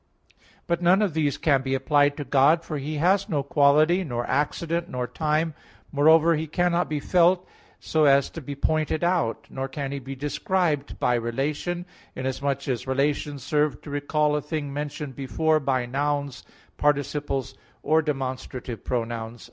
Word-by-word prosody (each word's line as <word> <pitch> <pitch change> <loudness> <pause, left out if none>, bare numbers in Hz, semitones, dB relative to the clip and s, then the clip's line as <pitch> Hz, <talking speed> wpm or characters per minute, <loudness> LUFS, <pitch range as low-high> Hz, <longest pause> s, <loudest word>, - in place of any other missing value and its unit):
But 170 0 -1
none 185 +4 +4
of 195 -6 0
these 150 -3 0
can 140 -4 +2
be 135 0 -1
applied 145 +1 +2
to 145 - -3
God, 140 +5 +3
for 155 -3 -4
He 150 +3 -4
has 190 +6 +2
no 145 -6 0
quality, 150 +6 +4
nor 120 -6 -3
accident, 170 +3 -1
nor 125 -1 -2
time; 155 +3 -1 0.4
moreover, 160 +3 +5
He 160 +1 -3
cannot 175 +2 +1
be 150 -1 -1
felt, 180 +3 +3 0.3
so 155 -1 +1
as 140 -1 +4
to 165 - -7
be 140 +1 -6
pointed 155 +2 0
out; 170 -10 0
nor 135 0 -3
can 135 0 -5
He 140 - -3
be 135 +1 -7
described 150 +1 -1
by 125 - +2
relation, 140 +9 -2 0.3
inasmuch 135 +1 -2
as 130 -1 -2
relations 140 +1 -1
serve 150 +1 +1
to 145 - -8
recall 150 +1 +1
a 150 - 0
thing 150 -1 -4
mentioned 145 -1 -5
before 155 +4 +1
by 130 -3 0
nouns, 140 +1 -2 0.3
participles, 145 -1 0 0.3
or 160 +1 +3
demonstrative 130 -4 -4
pronouns. 115 -1 -3
145 Hz, 160 wpm, -25 LUFS, 135-160 Hz, 0.4 s, moreover